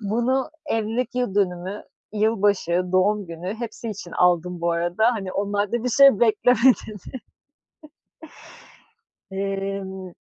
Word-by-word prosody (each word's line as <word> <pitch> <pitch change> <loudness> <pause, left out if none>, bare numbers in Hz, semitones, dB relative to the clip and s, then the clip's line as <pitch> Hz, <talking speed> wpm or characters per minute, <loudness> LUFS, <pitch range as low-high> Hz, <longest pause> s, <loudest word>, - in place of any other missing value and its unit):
Bunu 240 +6 0 0.2
evlilik 225 +1 -2
yıl 245 -6 -1
dönümü, 190 0 -1 0.3
yılbaşı, 205 -4 +1
doğum 200 +2 +2
günü, 170 +4 -6
hepsi 230 0 -6
için 190 -4 -8
aldım 180 0 +1
bu 170 0 +1
arada. 175 +8 +1
Hani, 195 -5 -5
onlarda 205 +3 -1
bir - - +1
şey 275 -2 +6
bekleme 235 +2 +3 0.3
dedi. 205 -4 -10 2.2
Emm 195 -1 -4
205 Hz, 110 wpm, -23 LUFS, 185-225 Hz, 2.2 s, şey